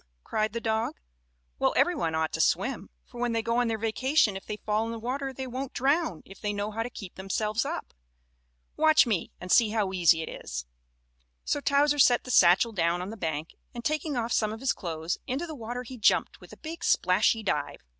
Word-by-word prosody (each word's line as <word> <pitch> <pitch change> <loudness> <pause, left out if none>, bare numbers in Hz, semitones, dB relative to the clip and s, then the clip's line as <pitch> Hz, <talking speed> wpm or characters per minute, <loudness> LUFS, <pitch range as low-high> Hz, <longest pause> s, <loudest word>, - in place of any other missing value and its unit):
cried 215 0 -1
the 235 - -3
dog. 220 0 -1 0.6
"Well, - - +2
every - - +4
one 160 -1 -1
ought 160 -1 0
to - - 0
swim, - - 0 0.2
for 240 - -10
when 240 -1 0
they 225 -1 0
go 230 +1 0
on 245 - +2
their 225 -1 -1
vacation 225 +1 +2
if 195 - -8
they 210 - -4
fall 215 +2 -1
in - - -4
the 230 - -5
water 265 +4 -3
they 265 0 -6
won't 260 +1 -5
drown 275 - 0
if 195 - -14
they 210 -1 -1
know 205 +1 -3
how 225 +2 -3
to 235 - -3
keep 195 -6 -9
themselves 210 +5 -1
up. 325 +4 -5 0.8
Watch 315 0 +5
me 210 -8 -1
and 180 0 -6
see 230 -3 +6
how 210 -3 -1
easy 170 -3 +4
it - - -8
is." - - -5 0.8
So - - 0
Towser 290 +1 +3
set 245 -2 +5
the 255 - -5
satchel 190 +2 +5
down 170 -3 +1
on 190 - -6
the - - -7
bank 160 -5 -3 0.3
and, 235 - -7
taking 305 -2 -1
off 235 0 -1
some 215 -1 +1
of 220 - -6
his 270 - +2
clothes, 165 -2 -4
into 270 +7 -2
the 320 - -7
water 245 -1 -5
he 250 0 -10
jumped 215 - +2
with - - -14
a - - -12
big 330 +2 -8
splashy 215 +4 +3
dive. 200 - -2
225 Hz, 225 wpm, -28 LUFS, 195-255 Hz, 0.8 s, see